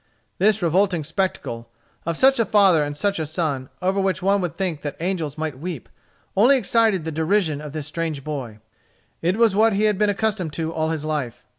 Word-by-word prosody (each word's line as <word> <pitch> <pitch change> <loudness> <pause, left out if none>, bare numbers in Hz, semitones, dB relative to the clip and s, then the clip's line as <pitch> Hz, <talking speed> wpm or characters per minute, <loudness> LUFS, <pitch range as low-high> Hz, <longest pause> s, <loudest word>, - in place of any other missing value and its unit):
This 210 +1 +3
revolting 175 0 +2
spectacle, 145 -8 -3 0.4
of 165 -1 -1
such 265 -1 +5
a 230 - +3
father 190 -6 +4
and 145 0 -4
such 200 +3 0
a 160 - -1
son, 145 -5 -2
over 190 +2 +1
which 190 -1 -1
one 200 +1 +3
would 175 -5 -4
think 175 -6 -2
that 145 -2 -5
angels 165 -4 -2
might 155 -4 -4
weep, 165 -4 -6 0.5
only 245 +8 +6
excited 220 -6 +2
the 160 - -3
derision 160 -1 0
of 150 -1 -7
this 155 -1 -5
strange 155 -2 -4
boy. 135 -8 -5 0.6
It 180 +4 +1
was 225 -4 +4
what 220 +1 +4
he 200 +2 +1
had 210 -2 +2
been 210 -1 +3
accustomed 200 -6 -1
to 160 0 -3
all 160 0 -1
his 155 -2 -3
life. 145 -7 -3
170 Hz, 200 wpm, -22 LUFS, 155-200 Hz, 0.6 s, only